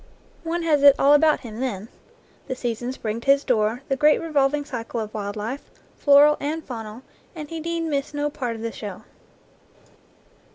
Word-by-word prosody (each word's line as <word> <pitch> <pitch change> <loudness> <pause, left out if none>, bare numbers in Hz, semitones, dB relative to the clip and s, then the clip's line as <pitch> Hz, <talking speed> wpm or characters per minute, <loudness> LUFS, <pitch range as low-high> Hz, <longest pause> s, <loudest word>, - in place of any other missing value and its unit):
One 335 +1 -2
has 305 -3 +2
it 280 -1 +8
all 280 +1 +5
about 305 +1 +4
him 225 -2 -9
then. 225 -6 -3 0.6
The 260 - -3
seasons 245 +1 -4
bring 220 +1 -4
to 275 - -5
his 280 +1 +3
door 230 0 0
the 270 - 0
great 300 +2 +4
revolving 290 -2 0
cycle 235 -4 -5
of 215 -1 -5
wild 205 -1 -4
life, 225 +7 -5 0.3
floral 290 +1 +5
and 310 +2 -3
faunal, 225 -1 -7 0.3
and 305 -2 -7
he 330 - -4
need 335 +1 -3
miss 290 -4 -2
no 290 0 -2
part 250 -6 -4
of 225 - -8
the 230 - -3
show. 205 -5 -8
275 Hz, 180 wpm, -23 LUFS, 230-295 Hz, 0.6 s, it